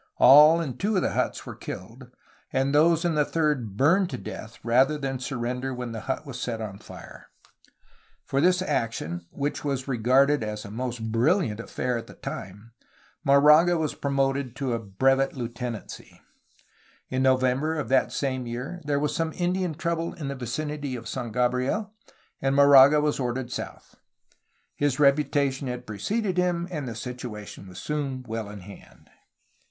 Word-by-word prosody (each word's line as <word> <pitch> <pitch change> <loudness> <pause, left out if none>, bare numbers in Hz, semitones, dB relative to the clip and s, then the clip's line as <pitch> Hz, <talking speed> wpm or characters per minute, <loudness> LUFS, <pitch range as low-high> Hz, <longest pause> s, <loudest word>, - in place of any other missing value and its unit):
All 150 +4 +8
in 135 -7 -4
two 210 +2 0
'of 185 - +2
the - - 0
huts - - -2
were - - -7
killed, 120 +7 -9 0.4
and 135 +1 +1
those 165 +3 +4
in 170 - +2
the 150 -1 +3
third 145 -10 -1
burned 175 - +3
to 125 - -4
death 110 -1 -8
rather 130 +6 +3
than 135 -2 -3
surrender 125 +1 -3
when 125 -1 -5
the 115 - -5
hut 130 - -2
was 130 -3 -7
set 115 -2 -3
on 100 -3 -6
fire. - - -12 1.0
For 135 - 0
this 180 +2 +3
action, 85 - -2
which 145 +1 -3
was 135 -2 -2
regarded 135 +2 +3
as 105 0 -5
a 100 - -9
most 115 -1 -4
brilliant 120 - +2
affair 120 +1 -2
at - - -10
the - - -13
time, 105 +5 -8 0.5
Moraga 150 +5 +6
was 155 -2 -1
promoted 135 -2 -1
to 135 -4 -2
a 115 - -1
brevet 135 +7 +1
Heutenancy. 120 -3 -6 0.9
In 130 0 -1
November 130 +4 +2
of 150 - -3
that 135 - +3
same 130 -3 -2
year 125 +9 -5
there 145 -1 0
was 150 +1 -1
some 165 -1 -1
Indian 180 -2 -1
trouble 170 +1 -2
in 145 -4 -5
the 140 - -4
vicinity 140 +2 -4
of 115 -1 -7
San 120 -2 -4
Gabriel, 125 - 0 0.5
and 135 0 +1
Moraga 140 +1 +7
was 150 -1 0
ordered 125 0 -2
south. - - -7 0.8
His 145 -2 0
reputation 140 -1 +2
had 125 0 -5
preceded 185 - -2
him, 175 -1 +1
and 150 -6 -4
the 115 - -5
situation 110 -5 -7
was 90 -1 -12
soon 135 -1 -3
well 110 -2 -4
in 105 -1 -9
hand. 100 +2 -15
135 Hz, 165 wpm, -26 LUFS, 120-150 Hz, 1.0 s, All